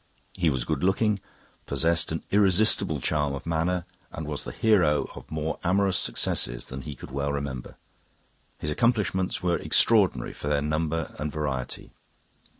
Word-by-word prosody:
He 85 -4 +1
was 65 -4 -1
good 75 -3 -1
looking, 100 +2 +2 0.5
possessed 80 +4 +1
an 80 - -3
irresistible 100 -4 +4
charm 75 +1 0
of 70 - -8
manner, 85 +2 0 0.3
and 80 - -6
was 75 -1 -2
the - - -5
hero 90 -9 +3
of - - -11
more 80 +1 -3
amorous 95 +1 +2
successes - - 0
than 65 +1 -7
he 75 +1 -7
could 60 - -11
well 70 +1 -1
remember. 70 -3 -4 0.8
His 75 - -3
accomplishments 105 -4 +1
were 90 -1 +2
extraordinary - - +3
for - - -7
their 75 -1 +1
number 80 +2 -1
and 75 0 -2
variety. 70 -5 -4
80 Hz, 150 wpm, -26 LUFS, 70-90 Hz, 0.8 s, irresistible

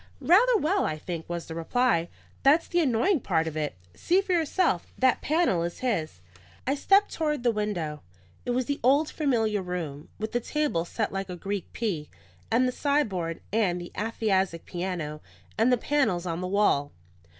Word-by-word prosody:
"Rather 455 +7 +5
well, 385 +3 +1
I 155 - -1
think," 165 +1 -6
was 170 -1 -4
the 160 - -7
reply. 170 +1 +1 0.3
"That's 295 +5 +4
the 350 - +1
annoying 300 - +2
part 165 -8 0
of 160 -1 -4
it. 150 -1 -2 0.2
See 360 +2 +2
for 390 -2 -1
yourself. 330 - +1
That 260 -1 +3
panel 310 - +2
is 170 0 -4
his." 165 - -2 0.4
I 270 - +1
stepped 395 +8 +3
toward 300 -5 -1
the 240 - +4
window. 180 -9 -3 0.4
It - - -6
was 250 +1 +1
the 285 +2 -2
old 280 +5 +3
familiar 225 -9 +1
room, 170 -5 -5
with 220 0 -4
the 240 - +1
tables 245 - -1
set 220 - -2
like 195 0 -3
a 180 - -4
Greek 195 +1 -4
P, 180 -10 -3 0.4
and 245 +3 +3
the - - 0
sideboard, 210 - -1
and 195 -6 +2
the 175 - -8
aphasiac 195 -5 0
piano, 175 -4 -4 0.3
and 230 +3 +3
the 250 - +4
panels 235 -11 +1
on 170 0 -3
the 185 - -2
wall. 185 -8 +2
215 Hz, 180 wpm, -27 LUFS, 170-280 Hz, 0.4 s, Rather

